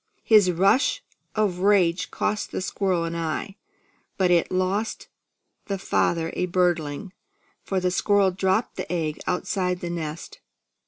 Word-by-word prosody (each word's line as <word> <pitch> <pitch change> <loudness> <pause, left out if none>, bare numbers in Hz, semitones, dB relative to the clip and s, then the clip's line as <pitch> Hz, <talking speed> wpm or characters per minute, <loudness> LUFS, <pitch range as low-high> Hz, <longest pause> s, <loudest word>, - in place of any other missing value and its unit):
His 210 -4 +5
rush 200 - +2 0.3
of 205 -5 0
rage 190 -3 +3
cost 210 0 -2
the - - -3
squirrel 185 -2 0
an 165 0 -3
eye; 170 +4 -3 0.6
but 185 -2 +2
it 170 -1 +3
lost 185 +4 -1 0.6
the 195 - -2
father 165 -3 0
a 180 - 0
birdling, 175 -1 0 0.5
for 190 - -1
the 180 0 0
squirrel 200 +1 +3
dropped 190 +4 0
the - - -5
egg 160 -4 -2
outside 180 0 -1
the 175 -1 -4
nest. 160 -1 -6
180 Hz, 140 wpm, -24 LUFS, 170-195 Hz, 0.6 s, His